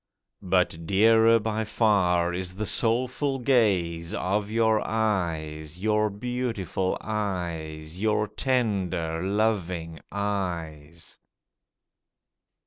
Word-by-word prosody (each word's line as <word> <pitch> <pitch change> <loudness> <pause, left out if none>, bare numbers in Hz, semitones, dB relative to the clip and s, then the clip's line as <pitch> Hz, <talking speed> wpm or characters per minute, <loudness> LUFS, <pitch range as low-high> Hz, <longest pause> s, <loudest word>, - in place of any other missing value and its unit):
But 90 -3 0
dearer 115 +4 +5
by 110 0 -2
far 90 -6 +2
is 90 0 -4
the 105 +2 -3
soulful 125 +5 +1
gaze 95 -10 +1
Of 100 +2 -1
your 110 -1 +2
eyes, 85 -7 -2
your 105 +1 +2
beautiful 105 -4 -2
eyes 85 -6 -4
Your 105 0 +1
tender, 100 -9 -1
loving 95 -5 -1
eyes. 85 -6 -4
100 Hz, 85 wpm, -26 LUFS, 85-110 Hz, -, dearer